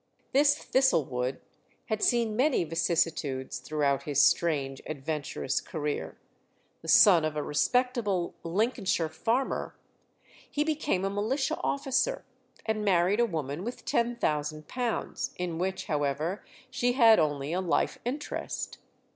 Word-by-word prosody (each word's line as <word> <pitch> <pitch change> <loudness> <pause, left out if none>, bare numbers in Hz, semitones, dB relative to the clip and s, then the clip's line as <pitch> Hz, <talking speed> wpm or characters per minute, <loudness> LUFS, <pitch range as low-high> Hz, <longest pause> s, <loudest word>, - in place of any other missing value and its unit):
This 285 +1 +5
Thistlewood 135 - +1 0.4
had 220 -2 -2
seen 230 -3 +2
many 260 - +2
vicissitudes 160 -6 -1
throughout 140 +1 0
his 145 -2 -1
strange, 140 -2 +2
adventurous 145 -2 -3
career. 150 -2 -4 0.6
The - - -11
son 180 -7 +7
of 155 -1 -1
a 150 - -1
respectable 210 - 0
Lincolnshire 185 -2 0
farmer, 230 +11 -1 0.7
he 295 - 0
became 300 -11 0
a - - 0
militia 225 +8 -1
officer, 280 - 0 0.4
and 220 -1 -1
married 190 +1 +3
a 240 - +4
woman 155 -3 -4
with 240 +3 -6
£10,000, 220 - -1
in 175 -2 -3
which, 190 +1 -2
however, 150 +5 -1 0.3
she 245 -1 +1
had 230 -5 +6
only 145 -1 0
a 185 - 0
life 180 -3 0
interest. 275 +5 -4
180 Hz, 120 wpm, -29 LUFS, 150-240 Hz, 0.7 s, son